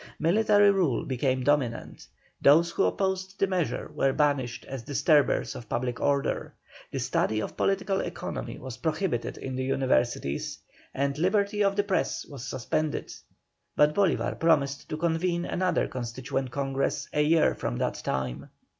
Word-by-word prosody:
Military 205 +4 +4
rule 175 -11 +1
became 130 0 0
dominant, 135 -4 -1 0.3
those 165 +4 +5
who - - +1
opposed 190 0 -1
the - - +3
measure 185 -4 -2
were 135 - +2
banished 135 -4 0
as 135 -2 -6
disturbers 145 +3 +2
of 115 - -9
public 120 0 -2
order, 140 -1 0 0.3
the - - -5
study 110 - 0
of - - -4
political 195 0 0
economy - - -5
was 130 -2 -8
prohibited 160 -5 -2
in 130 -1 -5
the 130 - -2
Universities, 125 - 0 0.3
and 140 +1 -1
liberty 200 +3 +2
of 195 0 +2
the 205 - +2
press 195 -2 -1
was 135 -4 -9
suspended, 155 +4 -2 0.6
but 150 0 +4
Bolívar 195 -2 +1
promised 140 -4 +2
to 155 - -3
convene 170 +1 0
another 185 0 0
Constituent 130 +2 -4
Congress 135 +1 -1
a 150 - +2
year 155 +1 +4
from - - -3
that - - -2
time. 65 -2 -3
145 Hz, 145 wpm, -27 LUFS, 130-180 Hz, 0.6 s, those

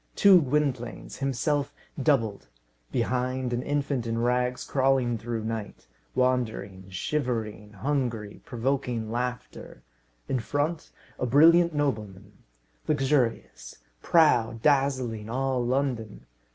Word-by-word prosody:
Two 195 -3 +7
Gwynplaines, 135 -4 -2
himself 140 +2 -1 0.3
doubled; 115 - +1 0.4
behind, 125 +1 -1
an 120 - -1
infant 140 -3 -1
in 115 0 -1
rags 125 +1 0
crawling 130 -3 +1
through 115 0 -4
night 110 -2 -5 0.3
wandering, 110 -7 -1
shivering, 110 -1 -3
hungry, 115 -3 -2
provoking 120 -2 -2
laughter; 125 +1 -5 0.4
in 130 - 0
front, 145 +7 -2 0.3
a 125 - 0
brilliant 165 +5 +5
nobleman 105 -9 -2 0.6
luxurious, 135 - 0 0.3
proud, 120 -9 +3
dazzling 130 -7 +1
all 130 0 0
London. 125 -4 -2
125 Hz, 100 wpm, -27 LUFS, 115-140 Hz, 0.6 s, Two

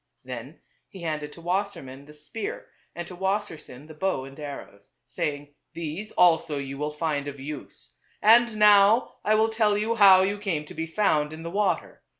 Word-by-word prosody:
Then 130 +3 -9 0.3
he 190 -4 -11
handed 150 -2 -3
to 170 - -13
Wassermann 175 -8 -3
the 150 - -13
spear 155 +9 -7 0.2
and 175 -1 -6
to 180 - -9
Wassersein 185 -8 -4
the 160 - -11
bow 155 -4 -1
and 135 +2 -13
arrows, 140 -8 -9
saying, 145 0 -4
" - - -53
These 170 +6 -5
also 165 -4 +3
you 140 0 -6
will 150 0 -1
find 150 -2 -2
of 140 -1 -7
use. 135 - -9 0.2
And 230 0 +5
now 210 +2 +5
I 215 - +3
will 220 +1 +3
tell 215 -2 +2
you 215 +2 0
how 195 -4 +7
you 200 +2 -1
came 170 -8 -2
to - - -11
be 160 - -4
found 155 -5 +1
in 160 +1 -9
the 170 - -6
water. 200 0 -1
165 Hz, 185 wpm, -26 LUFS, 145-205 Hz, 0.3 s, how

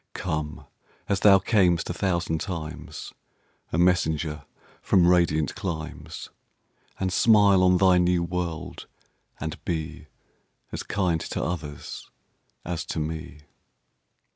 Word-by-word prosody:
Come, 75 -4 -3 0.4
as 100 - +1
thou 100 -2 +7
cam'st 90 -4 +2
a - - -3
thousand 85 -3 -1
times,A 80 -3 -8
messenger 80 -4 +1 0.4
from 90 -3 +4
radiant 85 -4 +3
climes, 80 -5 -6 0.7
And 95 -1 -1
smile 100 -4 +5
on 90 0 +5
thy 95 -1 +5
new 90 -1 +2
world; 85 -2 -4 0.5
and 80 0 -5
beAs 80 -2 -7
kind 90 -5 0
to - - -3
others 75 -4 -5 0.6
as 85 -1 -3
to 80 - -3
me. 80 -1 -5
85 Hz, 105 wpm, -26 LUFS, 80-90 Hz, 0.7 s, thou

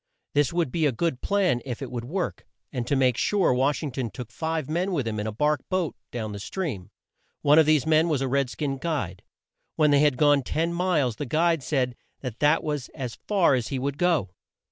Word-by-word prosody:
This 145 -3 +2
would 170 -6 0
be 160 0 +2
a - - +2
good 130 +1 -1
plan, 195 -11 +1
if 125 -4 -5
it 135 -3 -6
would 120 -2 -4
work; 180 +7 -3 0.3
and 120 -3 -3
to 140 - +1
make 130 -3 +3
sure, 190 +3 +2
Wash 135 +5 +1
ing 145 - -3
ton 125 -2 -3
took 115 +3 -8
five 160 -1 -2
men 180 +5 -1
with 140 -8 -1
him 110 -1 -2
in 105 - -2
a - - -2
bark 150 +5 +1
boat 185 -4 -1
down 110 -3 -4
the 100 - -6
stream. 125 - -4 0.5
One 145 +2 +6
of 155 - +5
these 155 -3 +4
men 160 +1 +3
was 150 -4 +1
a 135 - -1
red 135 0 +1
skin 135 0 -3
guide. 130 - -3 0.5
When 150 -2 +4
they 145 - +5
had 145 -3 +3
gone 145 -1 +4
ten 165 +6 -1
miles, 165 -10 +1
the 145 - -4
guide 165 +3 +2
said 125 -2 -1 0.3
that 125 -4 -6
that 150 +2 +3
was 150 -4 -3
as 125 -4 -5
far 195 -8 +4
as 125 -4 0
he 135 - -3
would 140 +2 -3
go. 170 - +2
145 Hz, 230 wpm, -26 LUFS, 125-160 Hz, 0.5 s, One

